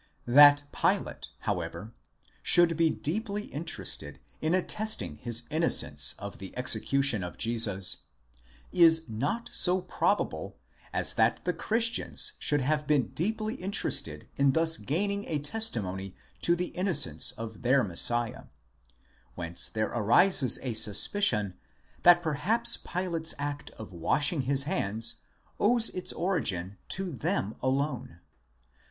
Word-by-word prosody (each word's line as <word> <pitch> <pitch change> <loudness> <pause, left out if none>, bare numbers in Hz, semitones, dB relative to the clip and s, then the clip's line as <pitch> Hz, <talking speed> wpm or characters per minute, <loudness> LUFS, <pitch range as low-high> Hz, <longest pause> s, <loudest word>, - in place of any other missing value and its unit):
That 145 +3 +6
Pilate, - - -2
however, 110 +3 -5 0.5
should 175 -1 +3
be 165 0 +2
deeply 205 +7 -3
interested 140 - -5 0.2
in 160 +3 0
attesting 185 - -2
his 120 +4 0
innocence 70 - +4
of 100 0 -9
the 95 +3 -10
execution 125 -1 +2
of 90 - -8
Jesus, 110 -5 +2 0.7
is 165 -2 +5
not 145 - -4
so 180 0 +4
probable 180 - -2 0.3
as - - 0
that - - 0
the - - 0
Christians 230 - +1
should 145 -1 0
have 150 +3 -1
been 145 -4 +1
deeply 215 +5 -3
interested 200 -5 -3
in 140 -1 +2
thus 165 +1 +4
gaining 200 +6 -3
a 155 - -2
testimony 110 - -4 0.3
to 170 - +2
the 180 +1 -4
innocence 180 -5 +1
of 110 0 -9
their 130 +2 +2
Messiah: 115 +5 -1 0.9
whence 85 -1 -3
there 110 0 -2
arises 130 - +3
a 125 -3 -3
suspicion 105 - +3 0.5
that 175 0 +5
perhaps 210 +10 +1
Pilate's 170 -3 -3
act 145 +1 -5
of 110 -3 -11
washing 145 - 0
his 135 +1 +2
hands 115 - -3 0.4
owes 230 +2 +4
its 185 - -3
origin 100 - -2
to 190 -1 -3
them 110 -5 -3
alone. 130 - -3
145 Hz, 120 wpm, -28 LUFS, 110-180 Hz, 0.9 s, That